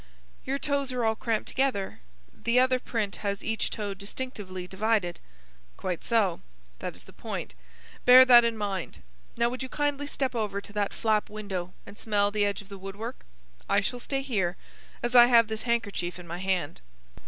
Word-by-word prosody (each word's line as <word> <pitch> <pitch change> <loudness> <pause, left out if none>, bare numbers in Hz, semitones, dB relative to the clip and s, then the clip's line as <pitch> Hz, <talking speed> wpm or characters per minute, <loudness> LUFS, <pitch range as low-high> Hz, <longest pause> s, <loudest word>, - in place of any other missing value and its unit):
"Your 270 +1 -1
toes 280 -2 -1
are 250 -2 -1
all 220 - +3
cramped 225 -1 -1
together. 260 -8 -1 0.3
The 235 +2 +2
other 255 0 +3
print 220 -5 -2
has 200 -1 -3
each 220 0 -1
toe 205 -3 -3
distinctly 200 -2 -6
divided." 195 -1 0 0.6
"Quite 180 -3 -3
so. 215 -7 +2 0.4
That - - -5
is - - -11
the - - -16
point. - - -5 0.5
Bear 255 +1 +9
that 240 -2 +9
in 230 -1 0
mind. 200 -4 -4 0.3
Now, 235 0 +3
would 255 +2 -5
you 260 - -4
kindly 290 0 -1
step 270 -2 -2
over 210 -4 -1
to 200 - -12
that 205 -1 0
flap 215 -2 +1
window 195 -4 -5
and 205 - -12
smell 205 -2 +1
the 205 -1 +2
edge 205 0 -2
of 195 - -21
the 200 -1 -9
wood 195 +1 -7
work? 230 +4 -7 0.4
I - - +4
shall 245 +4 -2
stay 270 +2 -2
here, 195 -10 -1 0.5
as 240 0 -1
I 240 -1 +9
have 230 -2 +5
this 220 +2 -4
handkerchief 200 -7 -1
in 180 - -10
my 170 +1 -6
hand." 185 - -1
215 Hz, 190 wpm, -28 LUFS, 195-245 Hz, 0.6 s, Bear